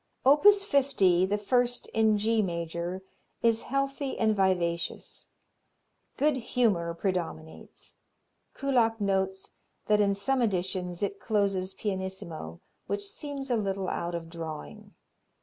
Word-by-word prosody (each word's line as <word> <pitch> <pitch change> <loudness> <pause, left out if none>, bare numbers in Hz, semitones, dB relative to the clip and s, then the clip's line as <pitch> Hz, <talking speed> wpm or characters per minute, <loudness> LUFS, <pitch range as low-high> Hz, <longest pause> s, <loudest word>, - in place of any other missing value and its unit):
Opus 395 +9 +6
50, 195 - +3
the 205 +2 0
first 245 +4 +1
in 220 -1 +3
G 220 +2 +2
major, 170 0 -3 0.4
is 230 -1 +3
healthy 275 +1 -2
and 220 -1 +2
vivacious. 180 -3 -1 0.9
Good 295 -1 +2
humor 205 -9 0
predominates. 170 -4 -5 0.6
Kullak 240 -5 +1
notes 190 -1 -1 0.3
that 210 0 +3
in 200 -1 +2
some 255 +7 0
editions 185 -3 -1
it 200 0 -2
closes 195 -4 0
pianissimo, 190 - -5 0.3
which 200 +1 -2
seems 275 +4 -5
a - - +3
little 195 -2 -2
out 170 0 -3
of 165 -1 -5
drawing. 165 +6 -8
200 Hz, 115 wpm, -28 LUFS, 180-235 Hz, 0.9 s, Opus